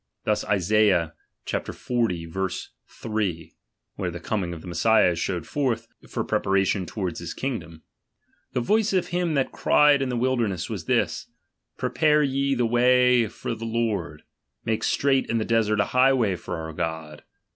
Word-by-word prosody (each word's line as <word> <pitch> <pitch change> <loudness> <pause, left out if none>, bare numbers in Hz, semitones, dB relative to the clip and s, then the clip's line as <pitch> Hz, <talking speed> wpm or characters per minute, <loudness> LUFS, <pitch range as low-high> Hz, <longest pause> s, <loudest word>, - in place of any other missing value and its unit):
Thus - - 0
Isaiah 95 -4 +2 0.3
xl. - - 0
3: 95 -2 -3 0.4
(where - - -2
the - - -6
coming 95 -5 -2
of 85 -2 -7
the - - -11
Mes 85 -1 -4
sias 110 -5 +5
is 85 - -3
shewed 90 -3 -2
forth, 120 -6 -1 0.2
for - - -2
preparation 95 -1 +1
towards 95 -6 -4
his 85 -1 -6
kingdom): 85 - -5 0.7
The 125 - 0
voice 215 - +2
of 185 -2 +1
him 175 -2 0
that 135 -2 0
cried 145 -2 +4
in 135 - -1
the 125 - -1
wilderness, 115 -7 0
was - - -5
this: - - 0 0.5
Prepare 150 -1 +2
ye 140 0 0
the 120 -1 +1
way 125 +1 +4
of 105 - -11
the - - -2
Lord, 110 -10 -2 0.4
make 110 -1 -1
straight 135 -1 +1
in 115 - +1
the 110 - -1
desert 110 -2 +2
a - - +3
highway 125 -6 +4
Jor 85 - -6
our 80 0 -6
God. 80 -2 -5
110 Hz, 160 wpm, -25 LUFS, 90-125 Hz, 0.7 s, sias